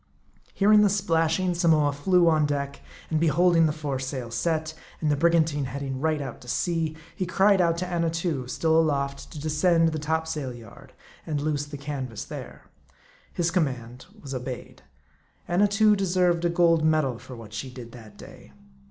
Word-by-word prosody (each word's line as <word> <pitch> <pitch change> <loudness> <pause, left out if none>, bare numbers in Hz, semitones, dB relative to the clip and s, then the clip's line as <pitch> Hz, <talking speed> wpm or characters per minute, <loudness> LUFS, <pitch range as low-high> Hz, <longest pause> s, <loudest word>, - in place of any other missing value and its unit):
Hearing 210 +1 +5
the 205 - +5
splashing, 180 -2 +1
Samoa 160 -4 +3
flew 175 +5 +3
on 155 -2 +3
deck; 140 -1 -3 0.3
and 155 - +2
be 165 - +2
holding 165 +1 +4
the - - 0
foresail 135 -5 -4
set, 160 +3 -1 0.3
and 155 -2 0
the - - +3
brigantine 155 -2 +2
heading 135 0 -5
right 155 -1 +1
out 135 -4 -7
to 125 - -14
sea, 160 +2 -1 0.2
he 185 - -3
cried 195 +1 +4
out 170 -1 +2
to 180 - -2
Annatoo, 165 -5 -2
still 160 +4 +2
aloft, 140 -3 -1
to 150 - -8
descend 160 +3 +2
to 165 - +2
the 155 - -3
topsail 160 -4 -2
yard, 115 -3 -14 0.3
and 150 -3 -1
loose 145 -1 -2
the 145 0 -7
canvas 135 -5 -5
there. - - -9 0.7
His 170 -1 -1
command 130 -6 -2
was 140 -6 -8
obeyed. 125 -1 -6 0.7
Annatoo 205 +4 +3
deserved 180 -3 +1
a - - +3
gold 170 -2 +3
medal 155 -6 +1
for 130 - -10
what 110 -3 -11
she 130 +6 -5
did 120 -2 -10
that 110 -4 -13
day. - - -14
155 Hz, 170 wpm, -26 LUFS, 140-170 Hz, 0.7 s, Hearing